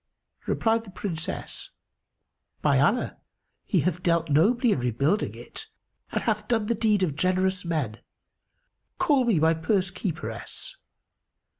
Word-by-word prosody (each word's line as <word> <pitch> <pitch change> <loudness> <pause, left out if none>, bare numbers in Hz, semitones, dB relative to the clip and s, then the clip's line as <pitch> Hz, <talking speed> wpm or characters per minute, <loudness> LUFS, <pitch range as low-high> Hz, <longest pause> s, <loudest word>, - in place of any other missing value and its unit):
Replied 225 0 +2
the 215 - -12
Princess, 175 -3 -4 0.9
"By 140 -3 +4
Allah, 195 - +2 0.5
he 185 -7 +2
hath 180 +2 -1
dealt 170 -3 +1
nobly 230 - +4
in 145 - +1
rebuilding 135 - 0
it 440 - -8 0.4
and - - -1
hath 215 -2 0
done 225 -3 +1
the 235 - +1
deed 210 -3 +2
of 155 -6 0
generous 185 +3 +1
men! 150 -10 -2 1.0
Call 275 -4 +3
me 225 -7 +3
my 160 +1 +4
purse 185 +3 +1
keeperess." 165 - -5
185 Hz, 130 wpm, -26 LUFS, 160-215 Hz, 1.0 s, By